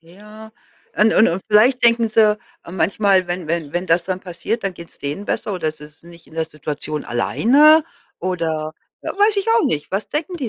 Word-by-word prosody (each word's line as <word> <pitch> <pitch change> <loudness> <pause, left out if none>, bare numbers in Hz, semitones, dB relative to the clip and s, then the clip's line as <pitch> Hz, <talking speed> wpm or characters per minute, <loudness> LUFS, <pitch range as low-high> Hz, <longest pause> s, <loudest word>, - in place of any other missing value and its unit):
Ja, 210 +6 -14 0.4
und 220 +1 +4
und 220 - +5
und 170 +3 -2
vielleicht 240 +5 +4
denken 230 -1 +4
sie 215 -1 +3 0.3
manchmal, 190 +2 +1
wenn 175 -1 -4
wenn 165 -3 -3
wenn 175 +1 -2
das 165 0 +2
dann 185 -1 -3
passiert, 185 +5 -4
dann 190 - -2
geht's 170 -1 -13
denen 145 +8 -5
besser 205 - -3
oder 160 -4 -2
sie 150 -1 -13
sind 160 +3 -19
nicht 170 -1 -16
in 160 - -18
der 160 - -1
Situation 150 -1 -6
alleine 295 - +4 0.3
oder, 160 -4 -3 0.3
äh, - - -5
weiß 410 +1 +2
ich 400 +1 -1
auch 455 0 +3
nicht, 150 -2 -2
was 195 +3 -3
denken 330 +4 -3
die 265 -8 -4
185 Hz, 200 wpm, -19 LUFS, 165-225 Hz, 0.4 s, und